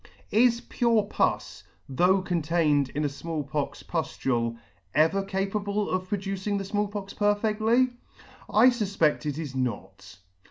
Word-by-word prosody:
Is 235 Hz, +1 st, +4 dB
pure 235 Hz, -3 st, +1 dB
pus, 200 Hz, -, -1 dB, 0.2 s
though 180 Hz, +8 st, +2 dB
contained 160 Hz, -5 st, +1 dB
in 150 Hz, +1 st, 0 dB
a -, -, +3 dB
Small 155 Hz, +2 st, -4 dB
pox 145 Hz, +1 st, -4 dB
puflule, 120 Hz, -8 st, -1 dB, 0.4 s
ever 160 Hz, +6 st, +3 dB
capable 200 Hz, +1 st, -2 dB
of 185 Hz, 0 st, -2 dB
producing 195 Hz, 0 st, -2 dB
the 195 Hz, -, -4 dB
Small 205 Hz, +1 st, 0 dB
Pox 200 Hz, -1 st, -6 dB
perfectly? 215 Hz, +4 st, +2 dB, 0.6 s
I 235 Hz, +4 st, +6 dB
fufped 195 Hz, -10 st, 0 dB
it 145 Hz, -1 st, -2 dB
is 155 Hz, -5 st, -5 dB
not. 100 Hz, -7 st, -4 dB
190 Hz, 130 wpm, -27 LUFS, 150-205 Hz, 0.6 s, I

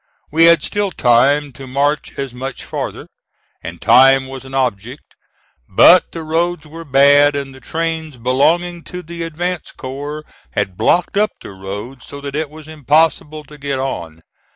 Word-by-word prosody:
We 165 Hz, +2 st, +5 dB
had 170 Hz, 0 st, +5 dB
still 205 Hz, -1 st, -1 dB
time 140 Hz, +1 st, +2 dB
to 135 Hz, +2 st, -10 dB
march 145 Hz, +3 st, -1 dB
as 135 Hz, -3 st, -4 dB
much 130 Hz, +1 st, -6 dB
farther, -, -, -5 dB, 0.6 s
and -, -, -8 dB
time 135 Hz, +1 st, +5 dB
was 135 Hz, 0 st, -9 dB
an 135 Hz, 0 st, -8 dB
object; 125 Hz, 0 st, -3 dB, 0.6 s
but 175 Hz, -, +6 dB
the 165 Hz, -, -6 dB
roads 170 Hz, +2 st, -1 dB
were 165 Hz, +2 st, -10 dB
bad 145 Hz, 0 st, +5 dB
and 140 Hz, -1 st, -4 dB
the 130 Hz, -, -13 dB
trains 160 Hz, +1 st, -4 dB
belonging 165 Hz, +8 st, +1 dB
to 180 Hz, 0 st, -7 dB
the 170 Hz, +1 st, -8 dB
advance 170 Hz, +1 st, -4 dB
corps 145 Hz, +4 st, -7 dB, 0.3 s
had 95 Hz, -, -2 dB
blocked 175 Hz, -, +1 dB
up 210 Hz, +1 st, +2 dB
the -, -, -10 dB
road 100 Hz, +7 st, -8 dB
so 140 Hz, -, -10 dB
that 140 Hz, 0 st, -6 dB
it 155 Hz, -1 st, -2 dB
was 155 Hz, 0 st, -13 dB
impossible 155 Hz, 0 st, +1 dB
to 150 Hz, 0 st, -15 dB
get 140 Hz, -1 st, -3 dB
on. 85 Hz, -12 st, -5 dB
145 Hz, 165 wpm, -17 LUFS, 130-160 Hz, 0.6 s, but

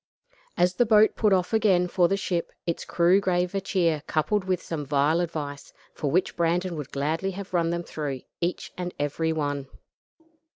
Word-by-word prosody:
As 180 Hz, +1 st, +3 dB
the 245 Hz, -, +2 dB
boat 215 Hz, 0 st, +5 dB
put 210 Hz, -2 st, +2 dB
off 185 Hz, +2 st, +2 dB
again 195 Hz, -5 st, +3 dB
for 175 Hz, -1 st, +3 dB
the 195 Hz, -, 0 dB
ship, 175 Hz, -3 st, -2 dB, 0.2 s
its 170 Hz, -, -2 dB
crew 180 Hz, +3 st, +3 dB
gave 180 Hz, -1 st, 0 dB
a 195 Hz, -, -1 dB
cheer 170 Hz, -6 st, +1 dB
coupled 185 Hz, +6 st, 0 dB
with 185 Hz, -2 st, 0 dB
some 160 Hz, -3 st, -5 dB
vile 145 Hz, +3 st, +2 dB
advice, 150 Hz, -5 st, -4 dB, 0.2 s
for 145 Hz, -, -2 dB
which 180 Hz, +6 st, +1 dB
Brandon 170 Hz, +1 st, 0 dB
would 150 Hz, -4 st, -6 dB
gladly 155 Hz, +7 st, -1 dB
have 195 Hz, 0 st, -7 dB
run 170 Hz, -2 st, +2 dB
them 170 Hz, 0 st, -2 dB
through, 145 Hz, -6 st, -4 dB, 0.2 s
each 175 Hz, +1 st, -2 dB
and 180 Hz, 0 st, -5 dB
every 145 Hz, +3 st, 0 dB
one. 145 Hz, -3 st, -2 dB
175 Hz, 180 wpm, -26 LUFS, 155-185 Hz, 0.2 s, boat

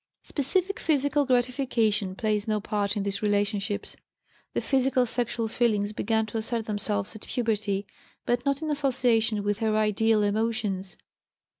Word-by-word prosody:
Specific 370 Hz, -, 0 dB
physical 285 Hz, -2 st, +1 dB
gratification 245 Hz, -6 st, +1 dB
plays 215 Hz, 0 st, -1 dB
no 215 Hz, -1 st, +1 dB
part 205 Hz, 0 st, -1 dB
in 200 Hz, -, -1 dB
these 200 Hz, 0 st, -1 dB
relationships. 205 Hz, -1 st, 0 dB, 0.6 s
The -, -, +2 dB
physical 265 Hz, -1 st, +2 dB
sexual 235 Hz, -1 st, -1 dB
feelings 215 Hz, -3 st, +1 dB
began 220 Hz, +1 st, 0 dB
to 220 Hz, +1 st, -4 dB
assert 225 Hz, 0 st, -2 dB
themselves 205 Hz, -1 st, -1 dB
at 215 Hz, -, -9 dB
puberty, 210 Hz, -4 st, -1 dB, 0.4 s
but 240 Hz, 0 st, +1 dB
not 280 Hz, +2 st, 0 dB
in 310 Hz, -, -1 dB
association 240 Hz, -7 st, +1 dB
with 205 Hz, +1 st, -1 dB
her 220 Hz, -2 st, +1 dB
ideal 215 Hz, 0 st, +3 dB
emotions. 205 Hz, -2 st, -1 dB
220 Hz, 140 wpm, -27 LUFS, 205-245 Hz, 0.6 s, ideal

